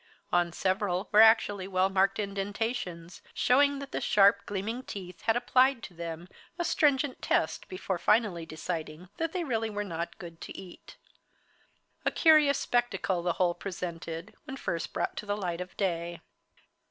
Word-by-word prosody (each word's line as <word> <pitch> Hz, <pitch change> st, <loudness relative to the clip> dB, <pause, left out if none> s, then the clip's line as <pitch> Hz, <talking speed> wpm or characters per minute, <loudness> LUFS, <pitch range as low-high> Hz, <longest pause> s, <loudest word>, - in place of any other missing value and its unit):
On 175 Hz, -1 st, +3 dB
several 185 Hz, +1 st, -1 dB
were 215 Hz, -, +7 dB
actually 220 Hz, -4 st, +5 dB
well 185 Hz, 0 st, +2 dB
marked 195 Hz, 0 st, +2 dB
indentations, 200 Hz, -3 st, -3 dB
showing 280 Hz, +2 st, +4 dB
that 280 Hz, 0 st, -5 dB
sharp, 200 Hz, 0 st, +4 dB
gleaming 205 Hz, +5 st, -3 dB
teeth 185 Hz, -7 st, -8 dB
had 225 Hz, 0 st, +2 dB
applied 255 Hz, +1 st, +3 dB
to 180 Hz, -, -8 dB
them 170 Hz, 0 st, -6 dB, 0.3 s
a 345 Hz, -, -1 dB
stringent 285 Hz, -4 st, +2 dB
test -, -, 0 dB
before 195 Hz, -, -3 dB
finally 200 Hz, -3 st, +2 dB
deciding 160 Hz, +1 st, -6 dB
that 330 Hz, 0 st, -1 dB
they 360 Hz, 0 st, -2 dB
really 225 Hz, -6 st, -1 dB
were 205 Hz, -1 st, -3 dB
not 170 Hz, -3 st, -5 dB
good 170 Hz, -2 st, -10 dB
to -, -, -8 dB
eat. 185 Hz, -2 st, -12 dB, 1.1 s
A -, -, +2 dB
curious 305 Hz, -4 st, +5 dB
spectacle 200 Hz, -7 st, 0 dB
the 175 Hz, 0 st, 0 dB
whole 175 Hz, -1 st, +1 dB
presented 170 Hz, -3 st, -6 dB
when 270 Hz, -, -7 dB
first 170 Hz, -9 st, -3 dB
brought -, -, -2 dB
to 210 Hz, -, -5 dB
the 205 Hz, 0 st, -1 dB
light 180 Hz, -3 st, -3 dB
of 180 Hz, 0 st, -8 dB
day. 170 Hz, -3 st, -2 dB
195 Hz, 155 wpm, -29 LUFS, 175-235 Hz, 1.1 s, were